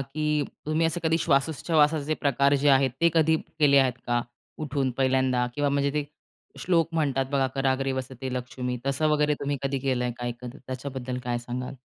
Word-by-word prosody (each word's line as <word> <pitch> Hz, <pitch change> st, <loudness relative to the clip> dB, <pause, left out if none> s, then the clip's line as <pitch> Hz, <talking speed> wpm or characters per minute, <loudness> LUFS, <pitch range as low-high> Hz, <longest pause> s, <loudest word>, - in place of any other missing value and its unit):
की 150 Hz, +2 st, -1 dB, 0.2 s
तुम्ही 155 Hz, +2 st, +2 dB
असं 165 Hz, +2 st, -2 dB
कधी 160 Hz, 0 st, +2 dB
श्वासोच्छवासाचे 155 Hz, 0 st, +2 dB
प्रकार 140 Hz, 0 st, +2 dB
जे 140 Hz, +1 st, +2 dB
आहेत, 135 Hz, -1 st, +4 dB
ते 170 Hz, -, +5 dB
कधी 160 Hz, 0 st, +4 dB
केले 145 Hz, -3 st, +2 dB
आहेत 130 Hz, -2 st, +3 dB
का? 120 Hz, 0 st, +1 dB, 0.4 s
उठून 135 Hz, -2 st, -1 dB
पहिल्यांदा 130 Hz, -1 st, +1 dB
किंवा 145 Hz, +1 st, +1 dB
म्हणजे 140 Hz, 0 st, +1 dB
ते 150 Hz, -1 st, 0 dB, 0.5 s
श्लोक 170 Hz, -2 st, +2 dB
म्हणतात 140 Hz, -4 st, +1 dB
बघा 135 Hz, -1 st, +2 dB
"कराग्रे 135 Hz, 0 st, 0 dB
वसते 130 Hz, 0 st, -5 dB
लक्ष्मी" 125 Hz, 0 st, -4 dB
तसं 140 Hz, +3 st, +1 dB
वगैरे 150 Hz, -1 st, +2 dB
तुम्ही 140 Hz, 0 st, -1 dB
कधी 135 Hz, 0 st, -1 dB
केलंय 125 Hz, -2 st, 0 dB
काय 120 Hz, 0 st, -2 dB
कधी 125 Hz, +3 st, -8 dB
त्याच्याबद्दल 130 Hz, -1 st, -5 dB
काय 120 Hz, -1 st, -1 dB
सांगाल? 125 Hz, +2 st, -5 dB
140 Hz, 170 wpm, -26 LUFS, 130-150 Hz, 0.5 s, ते